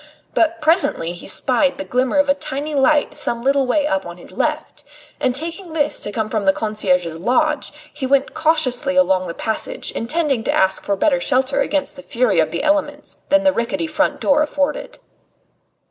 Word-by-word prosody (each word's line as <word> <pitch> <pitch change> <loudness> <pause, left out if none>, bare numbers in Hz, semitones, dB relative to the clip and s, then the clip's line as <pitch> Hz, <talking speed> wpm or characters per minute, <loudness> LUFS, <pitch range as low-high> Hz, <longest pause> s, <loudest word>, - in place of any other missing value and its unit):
But 335 0 +1
presently 305 - +1
he 175 - -10
spied 270 +2 +1
the 290 - -4
glimmer 255 +1 0
of 285 0 +3
a 280 - +4
tiny 285 +2 -5
light 295 +1 +2
some 235 -5 -2
little 275 0 +2
way 290 +3 +2
up 195 -9 0
on 175 0 -9
his 175 - -12
left, 300 +7 -3 0.4
and 255 -1 0
taking 330 +4 -4
this 295 -2 0
to 205 - -4
come 215 +1 -2
from 215 -2 -2
the 195 - +5
concierge's 180 -7 0
lodge, 295 - 0 0.2
he 265 - -4
went 275 +1 +2
cautiously 300 -4 +1
along 190 -10 +3
the 170 - -6
passage 220 - -3
intending 275 -1 -1
to - - +1
ask 190 0 +1
for 200 - 0
better 270 +5 +1
shelter 265 +2 +1
against 290 0 -1
the - - -8
fury 235 -9 +1
of 155 -1 +2
the 170 - -3
elements 295 -1 -1
than 290 0 +4
the 285 -1 +4
rickety 285 +7 -2
front 310 -1 0
door 290 +1 +3
afforded. 290 -1 -2
275 Hz, 190 wpm, -19 LUFS, 220-300 Hz, 0.4 s, the